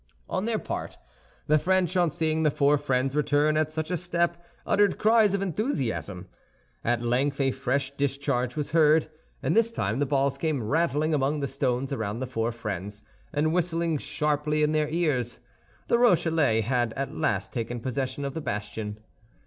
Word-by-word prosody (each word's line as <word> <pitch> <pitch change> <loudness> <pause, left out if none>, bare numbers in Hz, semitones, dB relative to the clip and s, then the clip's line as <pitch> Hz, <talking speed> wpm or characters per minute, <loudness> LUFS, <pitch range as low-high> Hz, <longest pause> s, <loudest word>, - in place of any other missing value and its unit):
On 190 - -2
their 230 -1 0
part, - - -5 0.5
the 155 0 +4
French, 185 +1 +1
on 175 -2 +3
seeing 160 +1 0
the 155 - +4
four 145 0 +3
friends 135 -1 0
return 150 +1 +2
at 155 0 +1
such 155 +2 -3
a - - +1
step, 170 0 -1 0.2
uttered 205 -1 +3
cries 215 -2 +4
of 195 - -1
enthusiasm. 135 - -2 0.6
At 120 0 0
length 135 +4 0
a 135 -1 +2
fresh 130 +2 -1
discharge 140 -3 -1
was 150 -2 -3
heard, 155 -1 +4 0.3
and - - +1
this 230 0 +3
time 110 - -1
the 145 - +1
balls 135 0 +1
came 150 -6 -1
rattling 155 +4 +1
among 145 +1 +1
the 140 - -1
stones 135 0 -1
around 110 -4 -3
the 130 - -2
four 115 -2 -2
friends, 105 -2 -6 0.3
and 155 +2 +1
whistling 170 -3 0
sharply 150 +1 0
in 150 - +2
their 155 -1 +1
ears. 145 -8 -1 0.5
The 235 - +3
Rochellais 165 - +3
had 120 0 0
at 140 0 -4
last 100 -1 -1
taken 120 0 -3
possession 130 +3 -3
of 140 - -3
the 160 - -4
bastion. 105 -3 -4
145 Hz, 175 wpm, -27 LUFS, 125-160 Hz, 0.6 s, the